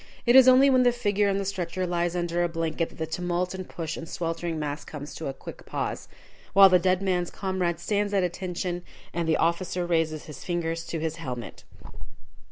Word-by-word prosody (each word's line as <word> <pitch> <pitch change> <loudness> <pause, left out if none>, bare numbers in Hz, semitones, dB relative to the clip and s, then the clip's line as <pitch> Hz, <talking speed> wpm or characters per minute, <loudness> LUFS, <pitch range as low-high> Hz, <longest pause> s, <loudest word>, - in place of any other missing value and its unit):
It 240 0 +5
is 260 -1 +9
only 260 +2 +7
when 260 -2 +5
the 245 -1 +5
figure 210 -4 +1
on 195 - +1
the 200 - -2
stretcher 185 -1 -2
lies 175 0 -1
under 175 0 0
a 175 - 0
blanket 165 0 -2
that - - -17
the 160 - -2
tumult 175 +2 -2
and 185 -1 -7
push 165 -2 -4
and 165 - -7
sweltering 165 -1 -3
mass 150 -1 -3
comes 145 -1 -8
to 160 - -5
a - - -1
quick - - -10
pause, - - -3 0.5
while 195 0 +9
the 180 -1 +5
dead 185 +2 +1
man's 180 -2 0
comrade 185 -3 -2
stands 205 +3 0
at 195 -2 +2
attention, 180 0 -3 0.3
and 170 -1 -1
the 160 - +3
officer 175 +2 0
raises 160 -3 0
his 150 - -10
fingers 165 -1 -2
to 165 - -3
his 160 0 -3
helmet. 125 -7 -7
175 Hz, 205 wpm, -26 LUFS, 165-190 Hz, 0.5 s, is